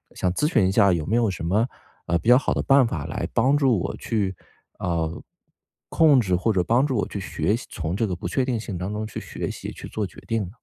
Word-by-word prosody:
想 90 - 0
咨 150 - 0
询 105 -7 +3
一 - - +1
下 100 -1 +5
有 80 -3 -1
没 115 - +1
有 115 -4 +2
什 85 - -6
么， 105 +8 +2 0.4
呃， 85 - +2
比 110 - -9
较 125 - +8
好 - - 0
的 - - -1
办 135 -1 +5
法 80 -9 -3
来 75 - -3
帮 135 +3 +3
助 130 -8 +3
我 - - -3
去， 100 -4 -1 0.4
呃， 85 -2 -2 0.7
控 155 -5 +5
制 95 -6 +1
或 90 +6 +1
者 90 - +2
帮 120 +8 +3
助 135 -4 -1
我 105 - 0
去 100 - -5
学 95 +1 -1
习 120 - -7
从 85 +1 -3
这 110 +2 +1
个 90 -3 -2
不 85 - -5
确 130 +7 0
定 120 -4 -1
性 100 -5 -5
当 95 +4 -4
中 110 +1 -3
去 105 - -6
学 - - -5
习， - - -6
去 - - -9
做 105 -2 -3
决 85 - -11
定 115 -2 0
呢？ 90 - -7
105 Hz, 280 characters per minute, -24 LUFS, 90-120 Hz, 0.7 s, 较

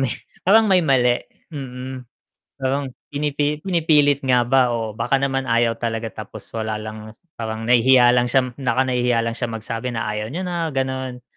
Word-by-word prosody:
may 135 -3 0 0.3
parang 220 +3 +6
may 185 - +5
mali. 125 -6 +3 0.3
Hmm. 130 -2 -7 0.5
Parang 135 -1 -2 0.2
pinipi 145 +1 -1
pinipilit 155 -6 +2
nga 125 -2 +3
ba 130 -1 +3
o 110 -2 -3
baka 135 - +1
naman 135 -1 0
ayaw 115 0 +3
talaga 115 -1 -3 0.2
tapos 105 -1 -12
wala 110 -1 -2
lang, 110 0 -8 0.2
parang 110 -1 -4
nahihiya 125 +1 +5
lang 125 0 +3
siya. 130 -1 +1
Baka 130 -1 0
nahihiya 125 -2 +1
lang 115 0 -2
siya 120 -2 -3
magsabi 115 +2 -4
na 115 -2 -3
ayaw 105 +1 -3
niya 175 +7 -4
na, 170 -2 -2
gano'n. 130 -2 -3
125 Hz, 170 wpm, -21 LUFS, 115-135 Hz, 0.5 s, parang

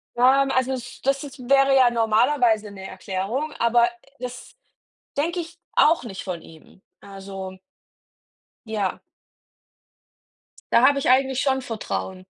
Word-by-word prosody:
Ähm, 270 +3 +4
also 260 +1 +1
es 245 -1 -7
das 275 +1 0
ist 275 -1 -10
wäre 275 0 +5
ja 255 -2 +6
normalerweise 225 -1 +2
'ne 190 -1 -10
Erklärung, 195 +10 -4
aber 235 +1 +4 0.3
das 250 0 -8 0.6
denke 340 +5 0
ich 340 +1 -9
auch 310 -5 +4
nicht 195 -5 -7
von 180 -3 -5
ihm. 165 +3 -17 0.2
Also 195 -1 -8 1.1
Ja. 210 -4 -2 1.7
Da 235 - +6
habe 280 -1 +3
ich 265 - 0
eigentlich 265 0 +3
schon 265 -1 +1
Vertrauen. 200 -6 -5
245 Hz, 125 wpm, -23 LUFS, 200-270 Hz, 1.7 s, ja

